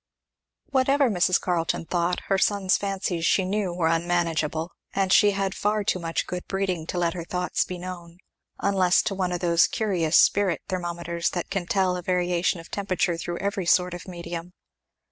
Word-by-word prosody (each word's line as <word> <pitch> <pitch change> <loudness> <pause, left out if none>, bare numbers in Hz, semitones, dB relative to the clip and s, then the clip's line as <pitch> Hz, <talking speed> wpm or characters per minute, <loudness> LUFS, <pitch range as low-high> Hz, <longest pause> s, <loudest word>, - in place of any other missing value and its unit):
Whatever 270 -1 +3
Mrs. 180 -1 +3
Carleton 170 -2 -1
thought, 175 +1 0
her 195 -1 0
son's 195 -2 +2
fancies 195 -4 -2
she 190 +2 +3
knew 195 -1 -1
were 175 -2 0
unmanageable; 165 -1 0 0.2
and 190 -1 +1
she 210 - +6
had 195 -1 -1
far 210 0 0
too 185 - 0
much 165 -1 -2
good 180 0 -6
breeding 185 -4 -2
to 180 - -3
let 170 -1 +1
her 175 -2 -5
thoughts 180 +1 -1
be 180 - -6
known; 175 -1 -8 0.4
unless 190 -2 +3
to - - -1
one 185 -2 -1
of 175 - -3
those 170 -1 +4
curious 180 -7 +1
spirit 195 -5 +3
thermometers 170 -1 -2
that 175 +1 -4
can 195 -3 -2
tell 185 -2 +1
a 180 - -4
variation 180 0 0
of 165 - -13
temperature 190 -3 0
through 170 +1 -4
every 200 -2 -2
sort 180 0 +3
of 175 +2 -8
medium. 170 -1 -7
180 Hz, 180 wpm, -25 LUFS, 170-195 Hz, 0.4 s, she